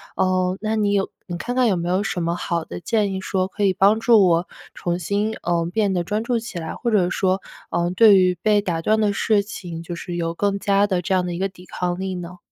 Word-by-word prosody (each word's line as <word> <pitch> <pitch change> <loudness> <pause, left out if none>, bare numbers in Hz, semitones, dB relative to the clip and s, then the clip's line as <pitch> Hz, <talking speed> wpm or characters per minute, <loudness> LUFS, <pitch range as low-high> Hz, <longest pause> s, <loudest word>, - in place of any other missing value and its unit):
呃， 185 0 +1
那 215 +1 -1
你 210 -2 +1
有 195 -1 +1 0.2
你 175 -2 -5
看 245 +8 -4
看 255 -1 +3
有 195 - +2
没 175 0 -3
有 190 +3 +1
什 180 -3 -2
么 170 +1 -1
好 170 -2 -2
的 - - -7
建 210 -2 0
议 190 - -4
说， 185 -1 -1
可 205 +1 -4
以 195 - +3
帮 200 +4 +4
助 225 -5 +5
我， 170 +1 +2 0.3
重 175 0 -2
新 205 +5 -1
呃， 170 -1 0
变 205 -2 +1
得 175 -2 0
专 210 +4 -2
注 240 0 0
起 220 -6 -6
来， 160 -1 -5
或 235 - -2
者 185 -4 +3
说， 190 0 0 0.3
呃， 170 0 0
对 205 +1 +6
于 185 -1 +3
被 210 -1 +4
打 170 -4 -2
断 215 +5 +2
的 210 -2 +2
事 210 0 +2
情， 175 -5 -7
就 170 +1 -6
是 175 +1 -6
有 165 -1 -2
更 200 +1 0
佳 200 0 +3
的 185 -3 0
这 190 - -1
样 180 -1 +1
的 175 - -3
一 170 - -5
个 195 - +1
抵 180 -1 -16
抗 180 0 -3
力 190 0 -3
呢？ 180 0 -7
190 Hz, 280 characters per minute, -22 LUFS, 175-205 Hz, 0.3 s, 对